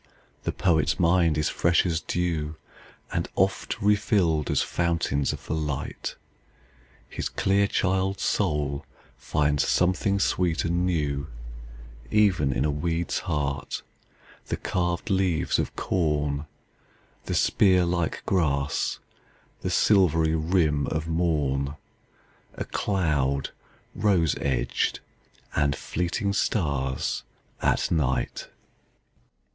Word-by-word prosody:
The - - +1
poet's 80 -5 +1
mind 85 -2 +3
is 75 - +1
fresh 85 +2 +2
as 85 -2 0
dew, 80 -3 -2 0.6
And - - -1
oft - - 0
refilled 100 -7 +2
as - - +2
fountains 85 -5 0
of - - -8
the - - -3
light. 75 -3 -3 0.9
His - - -4
clear 100 +1 +2
child's 95 0 0
soul 70 -2 0 0.3
finds 75 -1 0
something 95 +2 +2
sweet 90 -4 +1
and 85 +2 +1
newEven 75 -3 -1 1.2
in 65 - 0
a 75 - +2
weed's 85 +3 -1
heart, 70 -2 -2 0.6
the - - -2
carved 90 +3 -1
leaves 95 -4 +1
of - - -2
corn, 75 -4 0 0.8
The - - -2
spear 95 -3 +4
like 85 -1 -1
grass, 70 -6 0 0.6
the - - -2
silvery 80 -6 +3
rim 80 -3 +1
of 80 0 -2
morn,A 75 -4 0 0.9
cloud 75 -8 0 0.4
rose 90 -8 +2
edged, 65 -3 0 0.6
and 70 -2 +2
fleeting 90 +7 -2
stars 70 - 0 0.4
at - - +1
night! 65 -5 0
80 Hz, 100 wpm, -26 LUFS, 75-90 Hz, 1.2 s, spear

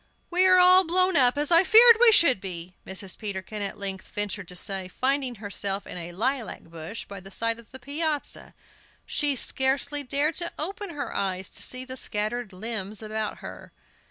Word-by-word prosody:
"We 365 +2 +4
are 370 0 +6
all 365 +1 +7
blown 365 +1 +2
up, 255 -2 +5
as 295 +3 0
I 335 +2 +7
feared 460 +3 +8
we 485 -1 +7
should 275 - +5
be," 180 -2 -7
Mrs. 190 0 -3
Peterkin 205 0 -6
at 200 -1 -4
length 195 -1 -5
ventured 205 -2 -4
to 180 - -8
say, 190 0 -2
finding 260 +4 -1
herself 200 -1 -2
in - - -8
a 175 -1 -7
lilac 240 +6 -3
bush 165 +6 -8
by 200 -1 -9
the 190 +1 -13
side 230 +3 -2
of 235 - -16
the 260 - -10
piazza. 290 +3 -4 0.5
She 290 -2 0
scarcely 270 +3 +1
dared 285 +4 0
to 345 0 -1
open 395 +5 -3
her 290 -5 -6
eyes 190 -1 -2
to - - -6
see 255 0 -1
the 260 0 -7
scattered 215 0 -2
limbs 210 +1 -5
about 215 0 -4
her. - - -10
240 Hz, 185 wpm, -25 LUFS, 195-295 Hz, 0.5 s, feared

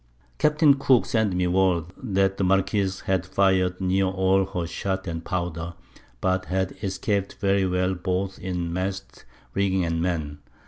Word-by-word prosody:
Capt. 150 +1 +1 0.2
Cooke 130 -3 +4
sent 110 -5 +1
me 90 0 +1
word, 90 -1 +2
that 95 -4 0
the - - 0
Marquiss 95 +1 +1
had 95 -2 0
fired 95 -1 +1
near 95 +1 +1
all 95 0 +2
her 90 -4 -3
Shot 95 +2 -3
and 80 -2 -4
Powder, 85 -2 -3 0.5
but 95 0 +1
had 95 0 -1
escap'd 100 0 -1
very 100 -1 +2
well 90 +1 +1
both 95 +1 -2
in 90 -2 -3
Masts, 95 +2 -4 0.3
Rigging 95 -1 +1
and 80 0 -1
Men. 80 -5 -2
95 Hz, 150 wpm, -25 LUFS, 90-95 Hz, 0.5 s, Cooke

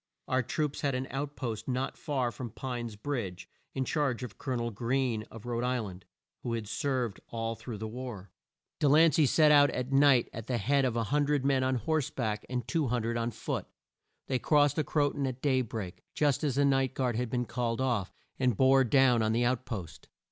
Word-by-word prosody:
Our 130 0 +2
troops 145 +4 -2
had 140 -3 0
an 130 +1 -2
out 145 +2 -3
post 110 -5 -4
not 130 +1 -1
far 130 -5 -1
from 120 -1 -6
Pine's 120 -2 -5
Bridge, 100 -7 -4 0.3
in 130 -1 0
charge 135 -5 0
of 105 -5 -8
Col 130 -2 -2
o - - 0
nel 120 0 -2
Greene 120 0 -1
of 115 0 -11
Rhode 120 0 -2
Isl 125 -5 -1
and, 90 +1 -14 0.4
who 120 - -3
had 115 -2 -3
served 125 -2 -1
all 115 0 -3
through 115 0 -7
the 110 +2 -5
war. 110 -5 -7 0.5
De 145 - +3
lan 160 +3 +6
cey 150 -3 +4
set 150 +4 +5
out 145 -1 +7
at 125 +1 -3
night 135 -3 +5
at 115 0 -7
the 125 - 0
head 135 +5 +2
of 125 -3 0
100 145 +4 +1
men 135 -2 +3
on 130 0 +1
horse 155 +3 0
back 110 -4 -3
and 125 -2 -3
200 120 -7 0
on 115 0 0
foot. - - -4 0.6
They 130 -2 0
crossed 145 0 +3
the 155 - +2
Cro 145 -2 +1
ton 140 -2 -2
at 130 -1 -4
day 130 -2 +2
break, 105 -6 -6
just 145 -1 +2
as 140 -4 0
the 140 +1 +3
night 135 -2 +2
guard 125 -3 0
had 125 +1 -1
been 125 0 -1
called 120 0 -2
off, 120 -8 0 0.3
and 125 -5 +2
bore 135 0 +5
down 125 -1 +4
on 110 0 +1
the 120 +1 +2
out 125 +1 0
post. 95 -10 -6
125 Hz, 215 wpm, -30 LUFS, 115-135 Hz, 0.6 s, out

